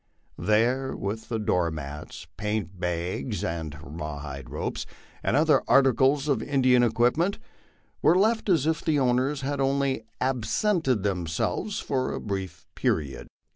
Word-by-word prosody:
These, 120 Hz, +7 st, +2 dB
with 105 Hz, +3 st, -4 dB
the 115 Hz, -, -1 dB
door 90 Hz, -5 st, +1 dB
mats, 75 Hz, -2 st, -7 dB
paint 105 Hz, -4 st, -3 dB
bags, 90 Hz, +5 st, -2 dB
rawhide 75 Hz, -4 st, -5 dB
ropes, -, -, -4 dB, 0.3 s
and -, -, +1 dB
other 150 Hz, -2 st, +4 dB
articles 135 Hz, +2 st, +4 dB
of 135 Hz, -6 st, +1 dB
Indian 130 Hz, -2 st, +3 dB
equipment, 120 Hz, -, +2 dB, 0.6 s
were 170 Hz, +3 st, +5 dB
left 220 Hz, +2 st, +2 dB
as 160 Hz, -6 st, +3 dB
if 160 Hz, 0 st, 0 dB
the 155 Hz, -2 st, +2 dB
owners 130 Hz, +2 st, +1 dB
had 140 Hz, +1 st, -2 dB
only 135 Hz, -1 st, +1 dB, 0.2 s
absented 130 Hz, -, +1 dB
themselves 95 Hz, -, -1 dB
for 130 Hz, -2 st, -1 dB
a -, -, -3 dB
brief 95 Hz, -3 st, -5 dB
period. 70 Hz, -4 st, -1 dB
120 Hz, 130 wpm, -26 LUFS, 90-140 Hz, 0.6 s, were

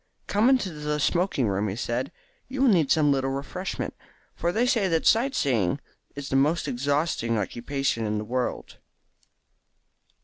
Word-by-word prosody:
"Come 215 Hz, +5 st, +3 dB
into 255 Hz, -8 st, +2 dB
the 150 Hz, 0 st, -2 dB
smoking 170 Hz, -, +1 dB
room," 100 Hz, +1 st, 0 dB
he 95 Hz, -, -3 dB
said; 120 Hz, +3 st, -2 dB, 0.4 s
"you 265 Hz, +1 st, -1 dB
will 270 Hz, -, +6 dB
need 165 Hz, -9 st, +3 dB
some 150 Hz, -3 st, +4 dB
little 135 Hz, -1 st, +1 dB
refreshment, 140 Hz, +8 st, -4 dB, 0.4 s
for 170 Hz, -, -1 dB
they 230 Hz, +6 st, +1 dB
say 230 Hz, -6 st, +2 dB
that 165 Hz, -2 st, 0 dB
sight 260 Hz, +5 st, +3 dB
seeing 120 Hz, -3 st, +1 dB, 0.4 s
is 140 Hz, -1 st, -6 dB
the -, -, -1 dB
most 150 Hz, +5 st, +2 dB
exhausting 140 Hz, -3 st, 0 dB
occupation 120 Hz, +2 st, -2 dB
in 105 Hz, 0 st, -1 dB
the 105 Hz, -, -3 dB
world." 125 Hz, +2 st, -3 dB
145 Hz, 160 wpm, -26 LUFS, 120-180 Hz, 0.4 s, will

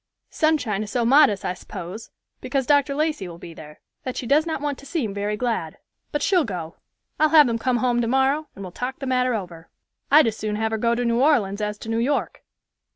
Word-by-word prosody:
Sunshine 285 Hz, -10 st, +1 dB
is 215 Hz, -, -5 dB
so 235 Hz, +2 st, 0 dB
modest, 265 Hz, -5 st, +4 dB
I 180 Hz, -, -1 dB
s'pose, 185 Hz, +3 st, -8 dB, 0.3 s
because 265 Hz, +1 st, -2 dB
Dr. 285 Hz, 0 st, +2 dB
Lacey 305 Hz, -, -1 dB
will 170 Hz, -1 st, -9 dB
be 170 Hz, 0 st, -10 dB
there, 150 Hz, -1 st, -13 dB, 0.2 s
that 255 Hz, -, -5 dB
she -, -, -4 dB
does 300 Hz, +6 st, +3 dB
not 320 Hz, -, -2 dB
want 290 Hz, -1 st, -3 dB
to 280 Hz, -, -13 dB
seem 270 Hz, -, -2 dB
very 205 Hz, +1 st, -2 dB
glad; 225 Hz, -10 st, -2 dB, 0.3 s
but 295 Hz, -1 st, -2 dB
she'll 365 Hz, -4 st, +3 dB
go. 175 Hz, -, -6 dB, 0.4 s
I'll 310 Hz, -, +4 dB
have 305 Hz, -2 st, +7 dB
them 230 Hz, -2 st, -1 dB
come 250 Hz, +1 st, +1 dB
home 240 Hz, 0 st, +1 dB
tomorrow, 265 Hz, +5 st, +1 dB
and 195 Hz, -, -8 dB
will 185 Hz, -, -7 dB
talk 250 Hz, +7 st, -5 dB
the 275 Hz, -, -6 dB
matter 255 Hz, -1 st, +1 dB
over. 170 Hz, -5 st, -7 dB, 0.4 s
I'd 300 Hz, +1 st, +7 dB
as 225 Hz, -2 st, 0 dB
soon 215 Hz, -1 st, -3 dB
have 220 Hz, +1 st, -1 dB
her 220 Hz, -, -1 dB
go 235 Hz, +1 st, +2 dB
to 245 Hz, +1 st, -1 dB
New 235 Hz, +1 st, +1 dB
Orleans 220 Hz, -9 st, +2 dB
as 210 Hz, 0 st, -2 dB
to 220 Hz, -, -9 dB
New 225 Hz, 0 st, 0 dB
York." 280 Hz, +5 st, -1 dB
240 Hz, 225 wpm, -23 LUFS, 210-280 Hz, 0.4 s, have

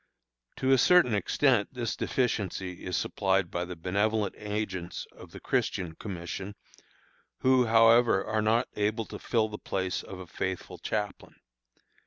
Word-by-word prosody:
To 130 Hz, -, 0 dB
a 135 Hz, -, +6 dB
certain 175 Hz, -6 st, +5 dB
extent 120 Hz, +2 st, +2 dB
this 120 Hz, -2 st, -2 dB
deficiency 95 Hz, -7 st, -2 dB
is 90 Hz, -2 st, -1 dB
supplied 95 Hz, -2 st, 0 dB
by 85 Hz, 0 st, -2 dB
the 90 Hz, 0 st, -7 dB
benevolent 100 Hz, +4 st, 0 dB
agents 105 Hz, -4 st, -4 dB
of -, -, -13 dB
the -, -, -10 dB
Christian 90 Hz, -5 st, -1 dB
Commission, 95 Hz, +2 st, -6 dB, 0.9 s
who, 130 Hz, -2 st, +4 dB
however, 115 Hz, -2 st, +5 dB
are 110 Hz, 0 st, 0 dB
not 110 Hz, +2 st, +2 dB
able 105 Hz, +2 st, 0 dB
to -, -, -8 dB
fill 110 Hz, -3 st, +1 dB
the 105 Hz, 0 st, -8 dB
place 95 Hz, -1 st, -2 dB
of 95 Hz, -, -9 dB
a 95 Hz, -, -8 dB
faithful 90 Hz, +2 st, -4 dB
chaplain. 105 Hz, +1 st, -4 dB
105 Hz, 145 wpm, -29 LUFS, 95-115 Hz, 0.9 s, a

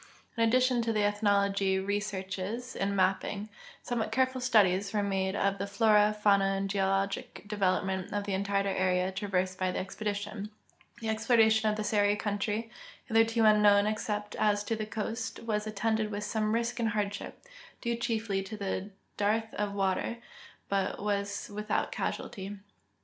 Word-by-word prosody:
In 230 Hz, -, -2 dB
addition 250 Hz, +2 st, +3 dB
to 230 Hz, 0 st, 0 dB
the 215 Hz, -1 st, +1 dB
ethnologic 200 Hz, -2 st, +2 dB
researches 200 Hz, +3 st, -3 dB
and 200 Hz, 0 st, -1 dB
ma])ping, 195 Hz, +2 st, 0 dB, 0.3 s
somewhat 225 Hz, -3 st, -2 dB
careful 260 Hz, +1 st, +1 dB
studies 200 Hz, -5 st, +3 dB
were 205 Hz, -1 st, +1 dB
made 190 Hz, -1 st, 0 dB
of 200 Hz, -1 st, 0 dB
the 200 Hz, -, -2 dB
flora, 210 Hz, +1 st, +4 dB
fauna, 200 Hz, -2 st, +3 dB
and 195 Hz, 0 st, -1 dB
geologic 195 Hz, +1 st, -1 dB
development 190 Hz, -2 st, 0 dB
of 205 Hz, 0 st, -1 dB
the 200 Hz, -1 st, -3 dB
entire 200 Hz, +1 st, 0 dB
area 185 Hz, -1 st, +1 dB
trav 195 Hz, +2 st, -4 dB
ersed 185 Hz, 0 st, 0 dB
by 185 Hz, -1 st, +1 dB
the -, -, -4 dB
expedition. 205 Hz, +1 st, -4 dB, 0.5 s
The 225 Hz, -, -2 dB
exploration 220 Hz, -1 st, +4 dB
of 210 Hz, -, 0 dB
the 215 Hz, -, -2 dB
Seri 205 Hz, -1 st, +2 dB
country, 210 Hz, +2 st, -2 dB, 0.3 s
hitherto 225 Hz, 0 st, +3 dB
unknown 210 Hz, -1 st, +6 dB
except 210 Hz, -1 st, -2 dB
as 205 Hz, -1 st, +2 dB
to 225 Hz, +2 st, -1 dB
the 215 Hz, -1 st, -4 dB
coast, 225 Hz, +1 st, -4 dB
was 215 Hz, -2 st, -2 dB
attended 215 Hz, +1 st, 0 dB
with 205 Hz, 0 st, -4 dB
some 215 Hz, +1 st, 0 dB
risk 235 Hz, +1 st, -1 dB
and 230 Hz, -1 st, +1 dB
hardship, 205 Hz, -1 st, -3 dB, 0.4 s
due 235 Hz, -1 st, -1 dB
chiefly 225 Hz, -4 st, -1 dB
to 195 Hz, -1 st, -4 dB, 0.3 s
dearth 220 Hz, +2 st, 0 dB
of 205 Hz, -1 st, -2 dB
water, 195 Hz, +4 st, 0 dB, 0.5 s
but 195 Hz, -1 st, -1 dB
was 200 Hz, 0 st, -2 dB
with 210 Hz, +1 st, -6 dB
out -, -, 0 dB
casualty. 200 Hz, -1 st, -4 dB
205 Hz, 155 wpm, -30 LUFS, 195-220 Hz, 0.5 s, unknown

